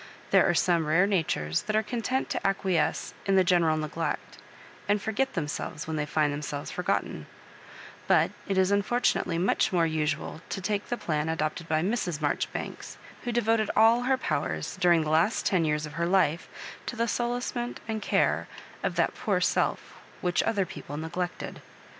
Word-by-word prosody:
There - - +5
are 175 - +2
some 170 -2 +2
rare 165 +5 +4
natures 155 - 0
that 215 - -2
are 215 - +3
content 245 +4 -1
to - - -1
acquiesce 190 -5 0
in 195 - +3
the 190 - +6
genpral 170 -3 +3
neglect, 155 +2 -4 0.5
and 205 +1 +3
forget 245 +6 -1
themselves 150 -2 -3
when 160 - -3
they 150 -1 -1
find 150 -1 +1
themselves 145 0 -4
forgotten; 180 - -2 0.8
but - - +4 0.2
it 195 -2 0
is 190 +1 +3
unfortunately 200 -3 +1
much 180 +3 +2
more 175 -3 +3
usual 155 0 -2
to - - -3
take 200 +2 -2
the 240 - -1
plan 155 -4 -1
adopted 160 +1 -2
by 155 0 +2
Mrs. 185 -6 -1
l|^ori 145 - 0
banks, - - -6 0.3
who 240 - -1
devoted 225 -2 +2
all 225 +2 +6
her 260 +1 +2
powers, - - -2
during 175 -3 +4
the 155 - -2
Last 165 +8 +2
ten 180 -4 +2
years 150 0 0
of 150 - -9
her 170 +2 -1
life, 175 -3 +2 0.4
to - - -3
the 230 0 0
solacement 240 +1 -2
and 220 -1 -2
care - - +1 0.3
of - - -1
that - - +2
poor - - 0
self - - 0 0.2
whkdi 175 -1 +2
other 205 -4 +1
people 145 -5 -8
ne 160 +1 -4
glected. 180 +1 -4
180 Hz, 175 wpm, -28 LUFS, 155-215 Hz, 0.8 s, the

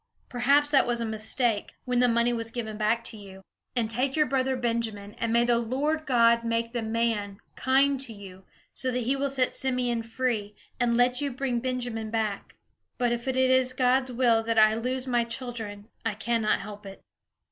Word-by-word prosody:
Perhaps 280 +4 +2
that 275 - +4
was 240 -1 0
a 230 - -1
mistake, 220 +1 +1
when 250 -1 0
the 250 - +4
money 235 0 +2
was 230 -1 -3
given 225 -2 -5
back 220 +2 0
to 220 - -5
you. 190 -2 -12 0.3
And 235 -3 +1
take 255 +5 -1
your 305 -1 +3
brother 265 -1 0
Benjamin, 230 -4 -3
and 230 -1 -1
may 235 +1 +3
the 240 -1 +3
Lord 290 +7 -1
God 235 -2 +4
make 230 0 -1
the 240 - -1
man 220 -3 -1 0.2
kind 270 +1 +2
to 260 -3 -5
you, 195 -3 -11 0.3
so 260 - -2
that 250 0 -1
he 255 +4 0
will 275 +1 -1
set 260 -2 +1
Simeon 250 -3 -1
free, 225 -3 -2 0.2
and 235 -1 +2
let 245 +2 +3
you 285 - -1
bring 255 -1 -2
Benjamin 240 -3 -3
back. 215 -3 -3 0.4
But 245 -2 +1
if 240 +1 -3
it 260 - 0
is 260 0 +3
God's 255 0 +2
will 235 -2 +3
that 225 0 -2
I 215 0 +6
lose 250 +3 -2
my 240 -2 +1
children, 230 -4 -5 0.2
I 225 -3 -2
cannot 220 -1 0
help 205 0 -9
it." 195 - -11
235 Hz, 195 wpm, -27 LUFS, 225-255 Hz, 0.4 s, I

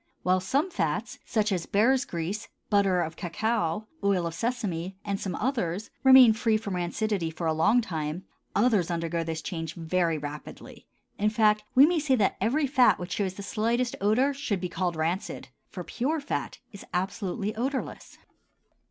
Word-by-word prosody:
While 185 +1 +3
some 280 - 0
fats, - - -2
such 215 -2 +1
as 180 -3 -1
bear's 255 +6 +3
grease, 175 +6 -4 0.2
butter 195 -3 +3
of 160 -1 -3
cacao, 210 +1 -1 0.2
oil 195 -3 +2
of 165 - -3
sesame, 190 -4 -3
and 200 -1 -2
some 185 -4 -3
others, 215 -7 -2
remain 260 -4 +9
free 220 0 +1
from 210 -3 -5
rancidity 180 0 -1
for 160 +1 -5
a 160 - +2
long 210 +10 +3
time, 160 -4 -4 0.3
others 205 -6 +3
undergo 170 -1 -1
this 160 -1 -4
change 165 -4 -5
very 170 -1 0
rapidly; 145 0 -9 0.3
in 210 +1 +3
fact, 215 -1 +3
we 265 +2 +9
may 335 +1 +2
say 285 -3 +2
that 210 -5 +2
every 270 +9 +2
fat 260 -2 +4
which 180 0 -7
shows 190 -1 -1
the 200 - -7
slightest 235 +4 0
odor 240 +8 +3
should 260 -8 -2
be 180 0 -3
called 175 0 -2
rancid, 165 +5 -3 0.2
for - - -7
pure 300 +7 -1
fat 285 - -4
is 200 - -10
absolutely 200 +3 -2
odorless. 265 +4 -4
200 Hz, 170 wpm, -27 LUFS, 175-235 Hz, 0.3 s, remain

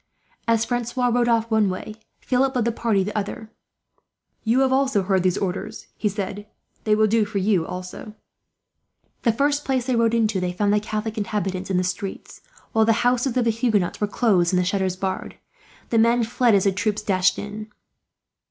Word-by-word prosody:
As 230 -1 +2
Francois 245 +1 -1
rode 240 0 +2
off 230 -1 +1
one 215 -2 +3
way, 185 +3 -5 0.3
Philip 260 +1 +1
led 240 -3 +1
his 235 - 0
party 220 -4 +1
the 210 +2 -5
other. 215 +1 -4 0.9
"You 240 +4 +2
have 265 0 +2
heard 190 -1 +2
these 180 -1 +1
orders," 195 +3 -4
he 210 - -1
said. 205 +1 -5 0.4
"They 215 -1 +3
will 215 0 +4
do 220 +1 +2
for 210 0 -4
you, 190 -4 +1
also." 185 +4 -7 1.1
The 235 - +3
first 285 +5 0
place 260 -3 -1
they 255 -1 0
rode 230 0 +2
into, 215 -4 +1
they 180 -1 -2
found 205 +2 +1
the 210 - +3
Catholic 215 +1 -4
inhabitants 195 -3 -3
in 190 - +1
the 180 - +2
streets; 185 +2 -5 0.3
while 220 - +3
the 225 +2 +2
houses 250 +1 +1
of 250 - +3
the 230 - +3
Huguenots 220 -6 0
were 210 - +2
closed, 195 -6 +2
and 180 - +3
the 180 - +1
shutters 190 -1 0
barred. 190 0 -4 0.6
The 230 - +3
men 235 +1 +4
fled 235 0 +2
as 195 - +3
the 195 - +3
troop 205 +2 -1
dashed 185 -1 +2
in. 210 +1 -7
215 Hz, 190 wpm, -23 LUFS, 195-235 Hz, 1.1 s, will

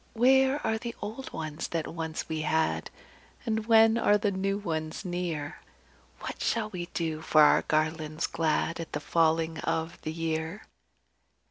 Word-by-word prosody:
Where 265 +4 +4
are 220 0 +1
the 235 0 -5
old 220 +6 -6
ones 155 -1 -4
that 165 -2 -2
once 160 -1 -4
we 160 -1 -2
had, 160 +1 0 0.6
And 220 -1 -1
when 225 0 +6
are 210 -2 +4
the 205 0 0
new 195 +1 -1
ones 160 -2 -4
near? 175 -5 -3 0.6
What - - -6
shall 220 -2 0
we 175 -3 -5
do 160 -2 -2
for 155 -1 +5
our - - +6
garlands 155 0 -1
glad 165 +1 0
At 165 - -6
the - - -1
falling 160 -1 +1
of 160 +1 -2
the 155 - -4
year?" 160 +4 -3
165 Hz, 155 wpm, -29 LUFS, 160-215 Hz, 0.6 s, when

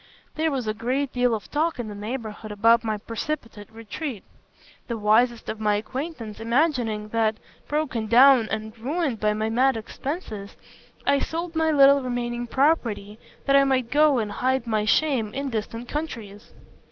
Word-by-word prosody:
There 320 +1 0
was 265 -5 -2
a 215 - -1
great 255 +5 -2
deal 245 -2 +2
of 210 - -8
talk 320 +3 0
in 240 -3 -4
the 210 - -6
neighbourhood 215 0 -6
about 230 +3 +4
my 215 -2 -1
precipitate 230 -1 -5
retreat; 225 +2 -6 0.6
the 235 - -3
wisest 225 +3 +2
of 220 - -4
my 210 -1 +2
acquaintance 235 0 -5
imagining 230 -4 0
that, 220 -1 +1 0.3
broken 285 -7 -1
down 245 0 +6
and 220 0 -4
ruined 280 -1 -1
by 210 0 +2
my 220 +1 -1
mad 255 +1 +3
expenses, 220 - -6 0.5
I 280 0 +3
sold 335 +2 -4
my 320 0 +2
little 280 -2 +6
remaining 240 -1 -3
property, 230 -7 0 0.3
that 275 - +3
I 275 - +7
might 260 -3 0
go 295 -1 +4
and 215 -3 -1
hide 260 +3 0
my 215 -2 0
shame 235 -3 +1
in 275 0 -3
distant 230 +2 -4
countries. 230 -10 -6
235 Hz, 165 wpm, -24 LUFS, 215-275 Hz, 0.6 s, I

